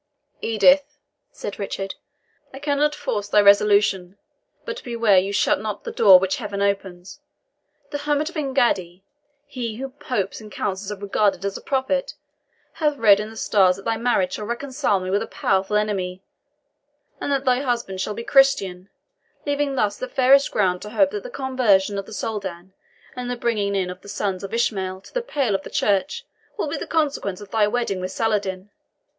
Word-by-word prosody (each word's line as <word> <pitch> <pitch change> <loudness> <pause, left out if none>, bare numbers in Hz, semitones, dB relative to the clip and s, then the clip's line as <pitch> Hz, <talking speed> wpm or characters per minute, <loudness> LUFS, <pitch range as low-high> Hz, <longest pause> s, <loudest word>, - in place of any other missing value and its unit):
"Edith," 275 +6 +3 0.3
said 205 - -7
Richard, 195 -1 -4 0.6
"I - - -7
cannot 290 +1 +1
force 215 -9 -3
thy 210 - +4
resolution; 200 -2 +4 0.5
but 485 0 -6
beware 230 -5 +3
you 195 +2 -2
shut 200 - +2
not 210 -1 -5
the - - -5
door 195 -5 +8
which 190 +1 0
Heaven 205 -4 -5
opens. 195 -2 -2 0.7
The 290 - -3
hermit 295 +1 0
of 345 - -7
Engaddi 235 - 0 0.4
he 235 -4 -5
whom 265 +3 -6
Popes 230 -7 -3
and 215 -1 -12
Councils 195 0 -3
have 205 -1 -7
regarded 200 -1 +1
as 200 - -2
a - - -6
prophet - - -1 0.6
hath 300 -3 0
read 210 -5 +6
in 210 +1 -4
the 225 - -12
stars 190 -4 +3
that 195 - -12
thy 225 - +1
marriage 225 -5 +1
shall 210 - -4
reconcile 255 -3 -1
me 185 0 -4
with 200 - +2
a - - -4
powerful 190 +2 0
enemy, 195 -3 -1 1.0
and 285 - -3
that 275 -1 0
thy 250 -1 +3
husband 235 -8 -2
shall 210 - -3
be 230 - -5
Christian, 200 -10 +2 0.6
leaving 285 -1 0
thus 210 -5 0
the 255 - -4
fairest 270 +2 +4
ground 180 -3 +1
to 210 - -7
hope 285 +6 +2
that 415 - -4
the - - -8
conversion 230 - +1
of 195 - -7
the - - -10
Soldan, 190 -5 -5 0.4
and 250 -1 -5
the 245 - -3
bringing 210 -4 0
in 185 -2 -1
of 180 - -11
the 200 - -13
sons 195 -2 -2
of 195 - -6
Ishmael 190 -5 -1
to - - -17
the - - 0
pale 280 - -1
of 195 - 0
the - - -10
church, 285 - 0 0.3
will - - -1
be - - -3
the - - -6
consequence 285 - -1
of 205 - -12
thy 215 -2 +3
wedding 210 -4 -1
with 185 0 -4
Saladin. 200 -3 -2
210 Hz, 185 wpm, -22 LUFS, 195-265 Hz, 1.0 s, door